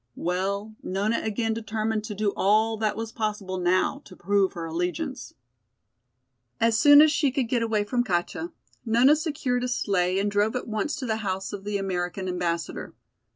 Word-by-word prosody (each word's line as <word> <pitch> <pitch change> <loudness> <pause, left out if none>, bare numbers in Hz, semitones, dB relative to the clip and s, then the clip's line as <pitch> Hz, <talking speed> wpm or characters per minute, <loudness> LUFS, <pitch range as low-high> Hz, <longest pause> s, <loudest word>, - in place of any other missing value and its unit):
Well, 200 +4 -2
Nona 205 +5 -1
again 220 +1 -1
determined 220 -1 -2
to 215 -2 -5
do 205 0 0
all 215 +3 +3
that 215 -1 0
was 225 0 -4
possible 210 -4 -3
now 185 +10 +1
to 185 - -13
prove 195 +1 +1
her 170 -3 -5
allegiance. 180 - -4 1.2
As 230 0 +3
soon 290 +6 +8
as 310 - +4
she 290 -2 +2
could 260 -2 -1
get 240 0 0
away 220 -2 +1
from 245 +3 0
Katja, 195 - -2 0.3
Nona 240 +5 +5
secured 285 -6 -1
a - - 0
sleigh 185 -6 0
and 200 +1 0
drove 205 +3 +1
at 250 - -3
once 220 +5 -2
to 275 - -5
the 220 -2 -1
house 195 -2 -3
of 200 -1 -7
the 205 -1 -1
American 185 -1 -3
Ambassador. 175 -2 -3
215 Hz, 175 wpm, -26 LUFS, 190-235 Hz, 1.2 s, soon